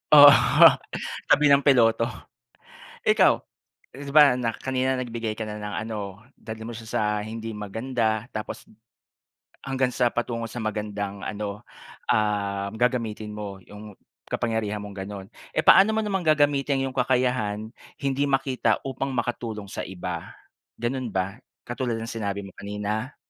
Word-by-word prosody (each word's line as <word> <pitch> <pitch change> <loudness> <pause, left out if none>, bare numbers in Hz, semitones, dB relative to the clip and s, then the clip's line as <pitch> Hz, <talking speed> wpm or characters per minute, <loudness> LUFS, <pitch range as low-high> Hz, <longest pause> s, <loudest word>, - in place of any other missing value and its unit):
Oo, 145 -1 +12 1.0
tabi 145 -1 +5
ng 140 0 +5
piloto. 115 -4 +4 1.0
Ikaw? - - +5 0.6
'Di 140 +1 -7
ba 145 -3 +7
na 120 -2 -1
kanina 130 0 -1
nagbigay 115 -3 -3
ka 110 - -3
na 105 0 -6
ng 105 0 -5
ano, 110 -2 -4 0.4
dalhin 110 0 -8
mo 120 - -6
siya 110 0 -9
sa - - +1 0.2
hindi 110 0 -6
maganda 110 +1 -2
tapos 110 - -6 1.0
hanggang 135 -1 0
sa 125 -2 +1
patungo 120 -1 -2
sa 115 +1 -6
magandang 105 -2 -4
ano, 105 +1 -5 0.4
um, 100 -2 0
gagamitin 115 -3 -1
mo 100 -2 -6
'yong 105 -1 -11 0.3
kapangyarihan 110 -3 -1
mong 105 -1 -8
gano'n. 100 -1 -7 0.3
Eh, - - +2
paano 200 +3 +8
mo 220 - +1
namang 195 -2 -1
gagamitin 145 -3 +2
'yong 130 - -4
kakayahan 125 -4 0 0.2
hindi 140 +1 0
makita 135 -1 +1
upang 135 +1 -3
makatulong 115 -4 -3
sa - - -5
iba, 90 -2 -6 0.5
gano'n 125 0 -2
ba? 95 +5 -3 0.2
Katulad 120 -1 -2
ng 115 +1 -5
sinabi 100 -3 -3
mo 95 - -12
kanina? 105 +5 -4
115 Hz, 140 wpm, -25 LUFS, 105-130 Hz, 1.0 s, Oo